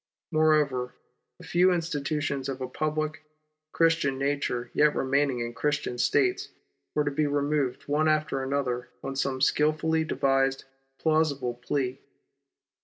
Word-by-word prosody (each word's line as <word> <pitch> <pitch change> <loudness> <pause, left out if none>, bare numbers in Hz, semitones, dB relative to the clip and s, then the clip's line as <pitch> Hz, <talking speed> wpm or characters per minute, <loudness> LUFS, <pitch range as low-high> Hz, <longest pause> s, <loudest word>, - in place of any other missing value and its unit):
Moreover, 150 -6 +2 0.4
the - - -13
few 180 +2 +4
institutions 150 -4 -2
of 135 -1 -4
a 130 - -3
public, 155 +2 -2 0.5
Christian 165 -5 +2
nature 135 -3 -1
yet 150 0 +3
remaining 135 -2 +1
in 120 0 -4
Christian 140 -1 -1
States 370 - +2 0.5
were 150 - +3
to 145 - -1
be 150 +1 +1
removed 145 -2 0
one 150 +2 +2
after 155 -3 +1
another 130 -2 -2
on 135 0 -4
some 135 -1 -1
skilfully 155 +3 +2
devised, 135 -3 +1 0.3
plausible 155 -6 +1
plea. 130 +1 -2
145 Hz, 125 wpm, -27 LUFS, 135-155 Hz, 0.5 s, few